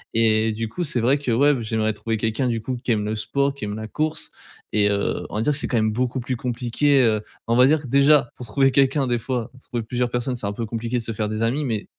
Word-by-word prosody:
et 110 -1 +3
du 115 +1 -3
coup, 175 +10 -3
c'est 130 -6 +1
vrai 130 +5 +3
que, 140 - -4
ouais 140 +6 +4
b 125 - -3
j'aimerais 110 0 0
trouver 115 +2 -3
quelqu'un, 110 +4 -1
du 115 -2 -1
coup, 130 +1 -3
qui - - 0
aime 105 -1 -1
le 105 - -2
sport, 140 +6 0
qui 140 -6 -6
aime 105 0 -4
la 110 0 -6
course 155 +5 -2 0.4
et 105 -1 +3
heu, 100 0 -1
on - - -7
va 110 - 0
dire 150 - +2
que 150 - +1
c'est - - -1
quand 120 - 0
même 110 -1 +2
beaucoup 125 +3 -1
plus 125 +1 -3
compliqué, 125 +4 +1
heu, 110 -3 +2 0.2
on 115 - +1
va 125 +1 +6
dire 155 +1 +2
que, - - -7
déjà, 140 0 +4
pour 125 - -7
trouver 135 +5 +3
quelqu'un 135 +1 +3
des 120 -2 0
fois, 125 0 -3 0.2
trouver 120 -2 -2
plusieurs 120 +2 -1
personnes, 120 +1 -2
c'est 105 -4 -4
un 100 - -2
peu 115 +2 -4
compliqué 115 +2 -3
de 115 - -3
se 115 - -4
faire 105 -1 -2
des 110 +1 -2
amis 130 +6 0
mais 115 -6 -2
120 Hz, 285 wpm, -23 LUFS, 110-135 Hz, 0.4 s, va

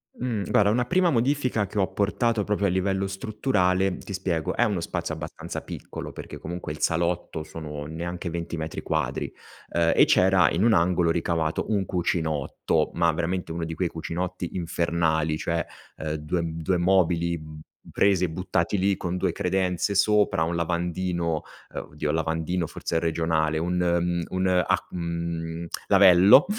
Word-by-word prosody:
Mh, 115 -5 -2
guarda 100 -1 +4
una 120 +3 +2
prima 180 +3 +3
modifica 125 -4 +1
che 100 +2 -4
ho - - +4
apportato, 105 +3 +1
proprio 100 -1 0
a - - +1
livello 95 +1 0
strutturale 95 -2 0
ti 100 - -8
spiego: 85 -4 -1
è - - +3
uno 100 -5 0
spazio - - -3
abbastanza - - -6
piccolo, - - -7
perché - - -8
comunque 85 -2 -6
il 75 - -7
salotto 85 -1 0
sono, 75 -2 -7
neanche 85 +2 -4
20 85 0 -4
metri 80 0 -5
quadri, 70 -5 -2 0.4
ehm, 85 -1 +2
e - - +7
c'era 95 0 +4
in 90 +5 +1
un 115 -1 +5
angolo 85 -2 +3
ricavato 80 -1 0
un 100 -3 +1
cucinotto, 80 -5 0
ma 85 -1 +3
veramente, 85 +1 -2
uno 85 0 -3
di 80 - -5
quei 90 +1 0
cucinotti 90 +2 -4
infernali, 85 -2 0
cioè, 85 0 -1 0.3
ehm, 80 0 -3
2 75 +3 -2
m 80 0 -4
2 90 +2 +1
mobili, 85 -2 +2
mhmm, 75 0 -10 0.3
presi 95 -2 +3
e 85 - -3
buttati 90 +3 -1
lì, 95 +1 +2
con 90 0 -3
2 - - +1
credenze 95 +1 0
sopra, 105 -5 +3
1 85 +1 -1
lavandino 85 -1 -1 0.3
ehm, - - -3
oddio, 75 0 -1
lavandino 80 +2 -1
forse 85 - -3
è - - +3
regionale, 80 -1 0
un, 90 +2 -1
mhmm, 85 0 +1
un 95 0 0
ac 90 -1 +2
mhmm, 85 -1 -3 0.2
lavello, 95 - +7
85 Hz, 165 wpm, -25 LUFS, 80-95 Hz, 0.4 s, e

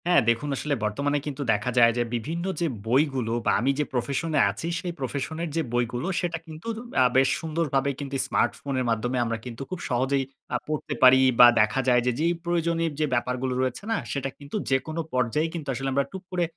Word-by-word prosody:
হ্যাঁ, 180 - +5
দেখুন 115 +5 0
আসলে 145 +2 -2
বর্তমানে 140 +8 0
কিন্তু 145 -1 -5
দেখা 105 +4 -1
যায় 115 -1 +7
যে 120 - +2
বিভিন্ন 165 +9 -3 0.2
যে 170 - +2 0.2
বইগুলো 130 -2 +1
বা - - +3
আমি 130 +6 +2
যে 150 - +2
প্রফেশনে 140 +5 0
আছি 165 - -5
সেই 175 -1 -4
প্রফেশনের 145 +5 -3
যে 165 - +2
বইগুলো 120 +4 -1
সেটা 170 -1 -2
কিন্তু 160 +6 -10 0.3
আ - - +7
বেশ 135 0 +5
সুন্দরভাবে 155 -4 0
কিন্তু 140 -1 -5
স্মার্টফোনের 130 +1 0
মাধ্যমে 120 +3 0
আমরা 115 -1 -2
কিন্তু 120 0 -7
খুব 185 - -5
সহজেই 135 +2 +1 0.3
আ - - +3
পড়তে 155 -1 -3
পারি 130 0 +8 0.2
বা 120 - +11
দেখা 110 +5 +1
যায় 125 -1 +5
যে 125 - +3
যেই 170 +2 +2
প্রয়োজনে 170 -1 0
যে 155 - +3
ব্যাপারগুলো 125 +1 -1
রয়েছে 130 +6 -2
না 225 - +2
সেটা 135 +2 -2
কিন্তু 140 +4 -9
যেকোনো 145 +5 0
পর্যায়ে 125 +5 +1
কিন্তু 160 -4 -6
আসলে 135 +2 -2
আমরা 140 +1 +2
টুক 190 0 -7
করে 180 -1 0
135 Hz, 195 wpm, -26 LUFS, 125-160 Hz, 0.3 s, বা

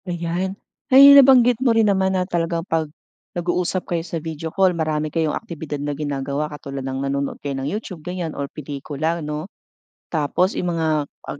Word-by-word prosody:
Ayan. 175 +3 -2 0.3
Ay 270 +1 +9
'yong 280 - +10
nabanggit 250 -3 +5
mo 260 - +3
rin 225 - +5
naman 190 -1 +2
na 180 - 0
talagang 170 -2 -2
'pag, 160 -4 -1 0.5
nag-uusap 180 +1 -1
kayo 165 -1 -1
sa 170 0 -5
video 160 0 -5
call, 190 0 +3
marami 155 -2 -2
kayong 160 -2 +1
aktibidad 160 -8 -6
na 145 +1 -2
ginagawa 140 0 -3
katulad 140 -2 -6
ng 135 +1 -3
nanonood 140 0 -2
kayo 140 -1 -4
ng 135 - -2
YouTube, 195 -4 -5
ganiyan 180 -1 -4
or 140 0 -4
pelikula, 150 +3 -4
'no, 150 0 -4 0.6
tapos 165 +4 0
'yong 175 -1 -1
mga 165 -1 0 0.4
ag 140 - -6
165 Hz, 180 wpm, -21 LUFS, 145-180 Hz, 0.6 s, yong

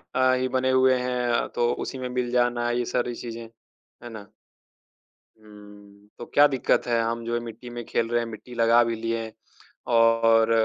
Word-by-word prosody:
अ, 130 0 +3
ही 130 0 0
बने 130 0 0
हुए 130 0 +4
हैं, 125 -1 -1
तो 120 0 0
उसी 135 - -6
में 125 -1 -5
मिल 125 -1 -2
जाना, 120 -1 +1
ये 120 0 -1
सारी 120 0 -2
चीज़ें। 115 -1 -8 0.6
है 120 - -8
ना। 110 -3 -10 1.2
हुँ, 105 -1 -16
तो 120 - -8
क्या 145 - +7
दिक्क़त 135 -3 0
है, 115 -1 +1
हम 115 0 -3
जो 120 - -3
है 120 - 0
मिट्टी 115 +2 -9
में 120 0 -7
खेल 115 - -1
रहे 120 0 +1
हैं, 115 - -4
मिट्टी 115 +2 -10
लगा 115 +1 +4
भी 115 -1 -2
लिए 115 0 -4 0.6
और 115 0 +4
120 Hz, 185 wpm, -25 LUFS, 115-125 Hz, 1.2 s, क्या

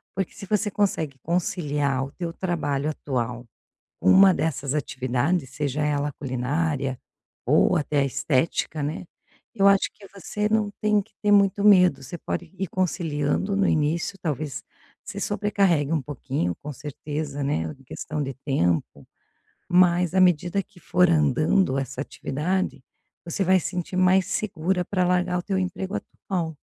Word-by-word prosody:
porque 190 -2 -2
se 200 - -10
você 210 +1 +1
consegue 165 -9 0
conciliar 145 -5 0
o 135 - -10
teu 170 -2 -5
trabalho 155 -6 -1
atual, 125 -5 -3 0.6
uma 190 - +7
dessas 145 -5 -1
atividades, 135 +2 -1
seja 145 +1 -2
ela 145 -1 0
a - - -7
culinária, 135 +1 -2 0.5
ou - - +4
até 150 -1 0
a 140 - +3
estética, 150 +3 0
né, 150 +5 -3 0.5
eu 200 -2 +4
acho 200 -1 +4
que 200 - -15
você 210 +2 -2
não 215 -1 +1
tem 210 -1 +3
que - - -18
ter 210 - +2
muito 200 0 +4
medo, 180 -8 +6
você 140 +7 -7
pode 170 +2 -5
ir 190 +1 -2
conciliando 170 0 -1
no 195 -1 +2
início 160 +5 0
talvez 150 -3 -3 0.4
se - - -7
sobrecarregue 195 -8 +1
um 155 - +1
pouquinho 130 - -3
com 150 - -5
certeza, 145 +1 -5
né, 135 - 0
em 135 - -20
questão 150 +3 -4
de 135 0 -4
tempo, 90 - 0 0.6
mas 180 0 +4
à 190 - +4
medida 180 +2 +3
que 195 -2 -21
for 180 0 +3
andando 155 +1 +2
essa 135 -1 -4
atividade, 150 +3 -2 0.4
você 170 +3 -1
vai 190 +1 +5
sentir 180 +1 -4
mais 185 0 +4
segura 185 -2 -1
para 185 0 0
largar 180 0 +1
o - - -3
teu 190 +1 -1
emprego 185 +1 -3
atual. 170 -5 -4
165 Hz, 155 wpm, -25 LUFS, 140-185 Hz, 0.6 s, uma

